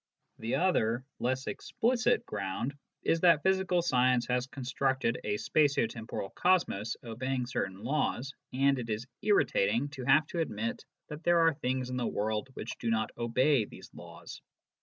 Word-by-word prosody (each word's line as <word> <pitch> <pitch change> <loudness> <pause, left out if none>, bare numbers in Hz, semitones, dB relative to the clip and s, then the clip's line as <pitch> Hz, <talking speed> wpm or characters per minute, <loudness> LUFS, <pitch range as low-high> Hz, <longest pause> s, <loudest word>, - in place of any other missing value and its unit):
The 115 +1 -1
other, 125 -9 +1
less 130 +2 -1
explicit, 240 +1 0
ground 100 +6 -3 0.3
is 165 - +2
that 170 -4 +5
physical 190 -2 +2
science 125 -5 +3
has 125 0 0
constructed 130 -2 -1
a 105 - -1
spatio 140 +1 +2
temporal 110 -3 -6
cosmos 165 - +1
obeying 125 +2 -2
certain 95 -5 -3
laws, 140 0 -1 0.2
and 135 +1 +2
it 115 -2 -5
is 110 +2 -2 0.2
irritating 120 - +2
to 135 -2 -7
have 150 +4 +5
to 170 - -3
admit 115 -7 -2 0.3
that 150 +1 -7
there 175 -1 +4
are 165 -1 +5
things 130 -2 -2
in 125 - -2
the 120 - 0
world 110 +4 -2
which - - -6
do 115 - -2
not 110 -1 0
obey 125 +2 +2
these - - -13
laws. - - -11
130 Hz, 160 wpm, -31 LUFS, 115-150 Hz, 0.3 s, that